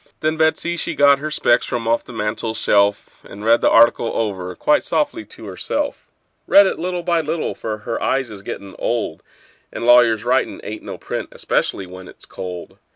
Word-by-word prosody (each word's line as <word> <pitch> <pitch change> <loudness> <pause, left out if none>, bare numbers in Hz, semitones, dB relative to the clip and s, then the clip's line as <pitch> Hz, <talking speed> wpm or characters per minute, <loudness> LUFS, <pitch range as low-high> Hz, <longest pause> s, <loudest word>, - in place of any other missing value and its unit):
Then 155 +1 +1
Betsey 160 +2 +1
she - - -3
got 140 -1 +5
her 155 +2 -4
specs 125 -5 +2
from 115 -2 -3
off 115 +1 +1
the - - -12
mantel 110 0 -3
shelf, 100 -1 +1
And 105 +2 -10
read 115 +1 +4
the - - +4
article 115 0 +5
over 95 -5 -3
quite 150 - +2
softly 150 -8 -1
to 110 - -12
herself; 95 -3 -3 0.4
Read 200 0 +7
it 190 - -1
by - - -12
little 175 -1 -2
and 155 - -4
little, 160 +1 -2
for 110 -1 -5
her 115 +2 -5
eyes 130 -4 0
is 100 -2 -9
gettin' 100 0 -8
old, 115 -9 -2 0.5
And 115 - -5
lawyers' 120 -2 +5
writin' 125 +2 0
ain't 110 - -6
no - - -7
print, - - -5
especially 95 - -1
when 90 0 -11
it's - - -14
cold. 90 -2 -8
115 Hz, 195 wpm, -20 LUFS, 105-145 Hz, 0.5 s, Read